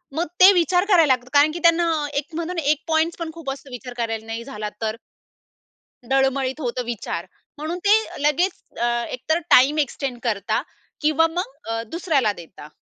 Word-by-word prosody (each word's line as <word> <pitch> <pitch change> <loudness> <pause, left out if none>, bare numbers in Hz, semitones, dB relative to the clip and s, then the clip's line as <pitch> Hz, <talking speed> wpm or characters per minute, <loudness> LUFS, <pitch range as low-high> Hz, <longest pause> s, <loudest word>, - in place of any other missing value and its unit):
मग 335 - 0
ते 375 +1 +10
विचार 355 +1 +2
करायला 330 -8 +6
लागतात, 250 0 -5
कारण 290 +2 +5
की 340 - -5
त्यांना 335 0 +4 0.3
एक 285 - 0
म्हणतो 340 +2 -3
ना 335 - -2
एक 305 - -1
पॉइंट्स 320 +1 +1
पण 335 -2 -5
खूप 330 -4 -7
असतो 275 0 -9
विचार 250 0 -8
करायला, 225 -2 -3
"नाही 225 +1 -5
झाला 215 -5 -5
तर?" 220 -1 -1 1.1
डळमळीत 270 +1 +1
होतं 250 -2 -2
विचार, 210 -7 -4 0.3
म्हणून 315 +4 -4
ते 410 - +7 0.3
लगेच 300 +6 +2 0.3
अ, 240 - +1 0.3
एकतर 280 +6 0
टाईम 275 +5 +6
एक्सटेंड 270 -3 -2
करता 210 -5 -1 0.4
किंवा 310 +1 +3
मग 390 +8 -3
अ, 225 0 -2
दुसऱ्याला 305 - +1
देता. 165 -5 -12
280 Hz, 175 wpm, -22 LUFS, 240-330 Hz, 1.1 s, ते